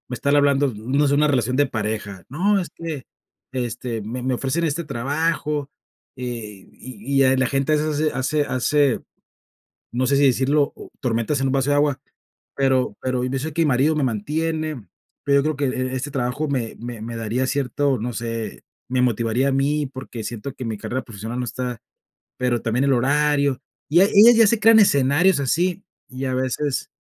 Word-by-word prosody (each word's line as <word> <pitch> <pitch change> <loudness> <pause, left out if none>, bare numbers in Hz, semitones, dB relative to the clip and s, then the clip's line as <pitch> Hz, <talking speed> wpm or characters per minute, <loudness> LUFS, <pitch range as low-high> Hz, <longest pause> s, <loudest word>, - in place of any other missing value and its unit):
están 140 +4 +1
hablando, 140 -2 +3
no 135 +7 +1
se, 140 - +2
una 150 +1 +4
relación 130 -2 +1
de 145 - +3
pareja, 105 -5 -4
no, 195 +8 +1
es 175 - -4
que, 160 -5 -6 0.5
este, 120 -2 -3
me 120 +4 -5
me 130 - 0
ofrecen 135 +7 -1
e - - +3
este 165 +4 -3
trabajo, 150 +2 -1 0.5
eh, 115 -6 -7
y 130 +3 -2
y 130 0 +4
la 130 - +2
gente 135 +3 0
hace 150 0 +1
hace 140 +3 0
hace, 135 +1 +1 0.9
no 125 +1 0
sé 140 - +3
si 140 - +4
decirlo, 140 +3 +2
o - - -11
tormentas 120 +2 0
en 135 - +1
un 135 - 0
vaso 135 0 +1
de 145 - +3
agua, 145 -2 +1 0.5
pero 130 -2 +1
pero 130 -1 -1
yo 130 +1 -1
sé 155 +3 -4
que 165 - 0
mi - - +2
marido 140 +4 +2
me 150 - 0
mantiene, 150 +3 -2 0.4
pero 140 0 +4
yo - - +1
creo 155 -1 0
que 145 - 0
e 130 0 -2
e - - -1
este 135 +3 -4
trabajo 135 +3 -2
me 125 -5 -2
me 120 -2 -7
me 115 +1 -6
daría 115 +3 -1
cierto, 140 0 0
no 120 +2 -3
sé 115 0 -5 0.3
me 125 0 +1
motivaría 120 +2 +1
a - - 0
mí 145 +2 +1
porque 130 -3 -8
siento 120 +5 -5
que 130 - -6
mi 110 -2 -3
carrera 120 +5 -4
profesional 110 +2 -6
no 125 - -2
está, 125 0 -4 0.6
pero 125 -2 0
también 120 +3 0
el 140 - +3
horario. 140 +1 +2 0.3
Y 170 +3 +6
ella 205 +4 +7
ya 225 - +7
se 230 +2 +2
crea 225 +1 +6
en 220 - +8
escenarios 145 +1 +4
así, 175 +7 0 0.3
y 130 +1 -5
a 130 - -1
veces 130 +2 -2
135 Hz, 195 wpm, -22 LUFS, 120-145 Hz, 0.9 s, en